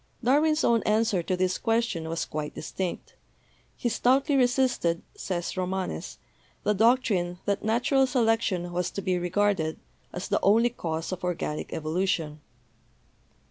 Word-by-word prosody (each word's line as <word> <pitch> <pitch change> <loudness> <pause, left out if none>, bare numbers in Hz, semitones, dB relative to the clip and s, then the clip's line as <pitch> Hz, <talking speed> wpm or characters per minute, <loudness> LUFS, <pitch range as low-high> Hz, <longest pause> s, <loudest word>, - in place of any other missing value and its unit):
Darwin's 305 +5 +3
own 230 -1 +3
answer 215 -3 +2
to 185 +2 -2
this 185 0 0
question 225 -8 0
was 165 0 -2
quite 150 -1 -5
distinct. 185 -2 -5 0.7
''He - - 0
stoutly 270 +6 +2
resisted/' 245 -9 +2
says 175 -2 -3
Romanes, 185 - -3 0.5
"the 210 - +2
doctrine 205 -5 +2
that 200 0 -1
natural 250 +5 +2
selection 225 -8 +1
was 180 0 -1
to 200 - -5
be 185 -2 0
regarded 180 -3 0 0.3
as 180 - -5
the - - +1
only 225 +4 +4
cause 165 -7 -4
of 185 0 -5
organic 170 -4 -3
evolution." 160 -1 -1
195 Hz, 135 wpm, -27 LUFS, 175-235 Hz, 0.7 s, only